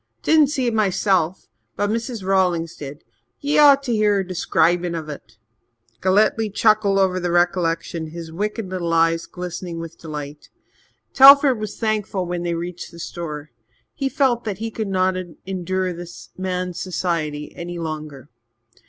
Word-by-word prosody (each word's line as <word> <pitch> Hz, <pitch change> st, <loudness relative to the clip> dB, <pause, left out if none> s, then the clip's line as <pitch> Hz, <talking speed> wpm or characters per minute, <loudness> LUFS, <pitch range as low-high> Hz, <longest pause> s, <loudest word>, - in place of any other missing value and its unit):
Didn't 310 Hz, -2 st, +5 dB
see 270 Hz, -3 st, -1 dB
it 235 Hz, -, 0 dB
myself 190 Hz, -4 st, +1 dB, 0.3 s
but 205 Hz, 0 st, 0 dB
Mrs. 230 Hz, -2 st, -3 dB
Rawlings 180 Hz, -4 st, +1 dB
did. 145 Hz, 0 st, -9 dB, 0.4 s
Ye 290 Hz, +1 st, +1 dB
ought 280 Hz, -2 st, +7 dB
to 250 Hz, -, -2 dB
hear 215 Hz, -2 st, +3 dB
her 195 Hz, -, +1 dB
describin' 175 Hz, -1 st, +1 dB
of 155 Hz, -2 st, -5 dB
it." 145 Hz, -, -10 dB, 0.6 s
Galletly 210 Hz, +3 st, +2 dB
chuckled 205 Hz, -1 st, +3 dB
over 185 Hz, -1 st, +2 dB
the 180 Hz, -1 st, -2 dB
recollection, 175 Hz, -2 st, 0 dB
his 165 Hz, 0 st, -8 dB
wicked 210 Hz, +4 st, -3 dB
little 180 Hz, -2 st, -3 dB
eyes 165 Hz, 0 st, +2 dB
glistening 180 Hz, -1 st, -6 dB
with 165 Hz, 0 st, -8 dB
delight. 150 Hz, -2 st, -8 dB, 0.6 s
Telford 275 Hz, -2 st, +8 dB
was 215 Hz, -1 st, -5 dB
thankful 210 Hz, -4 st, -1 dB
when 175 Hz, 0 st, -3 dB
they 170 Hz, -1 st, -1 dB
reached 175 Hz, +1 st, -6 dB
the 170 Hz, -, -14 dB
store. 155 Hz, -4 st, -6 dB, 0.4 s
He 275 Hz, -1 st, -2 dB
felt 260 Hz, -4 st, +1 dB
that 210 Hz, -4 st, -4 dB
he 225 Hz, +2 st, -4 dB
could 220 Hz, -1 st, -3 dB
not 185 Hz, -1 st, +1 dB, 0.3 s
endure 185 Hz, 0 st, -2 dB
this 175 Hz, 0 st, -10 dB
man's 180 Hz, -1 st, -3 dB
society 165 Hz, -5 st, -2 dB
any 175 Hz, 0 st, -6 dB
longer. 155 Hz, -4 st, -6 dB
185 Hz, 155 wpm, -21 LUFS, 170-210 Hz, 0.6 s, Telford